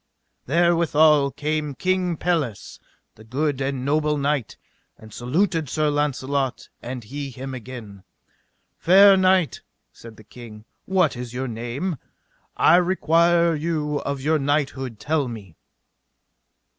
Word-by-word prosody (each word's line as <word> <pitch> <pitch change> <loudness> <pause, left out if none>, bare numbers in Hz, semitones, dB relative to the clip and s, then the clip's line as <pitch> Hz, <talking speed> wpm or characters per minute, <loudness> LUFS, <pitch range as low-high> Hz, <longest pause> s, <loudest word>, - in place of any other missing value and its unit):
Therewithal 160 -2 +3
came 150 +1 -3
King 185 +1 -1
Pelles, 150 - -2 0.3
the 110 - -16
good 135 +4 -2
and 135 -1 -2
noble 150 +1 +1
knight, 140 -4 -2 0.4
and 110 -1 -15
saluted 160 +4 -1
Sir 155 0 0
Launcelot, 140 -2 -2
and 125 0 -6
he 140 +5 -6
him 130 +1 -7
again. 115 -6 -9 0.8
Fair 195 +3 +7
knight, 185 -3 +2 0.3
said 115 -1 -13
the 110 - -14
king, 110 -1 -13 0.2
what 185 -7 +1
is 120 0 -7
your 130 +1 -3
name? 120 +9 -4 0.6
I 170 - +6
require 170 -1 +3
you 150 -2 -2
of 140 -1 -4
your 155 +3 +1
knighthood 135 -5 -2
tell 145 +4 -1
me! 105 -8 -9
145 Hz, 120 wpm, -23 LUFS, 125-165 Hz, 0.8 s, Fair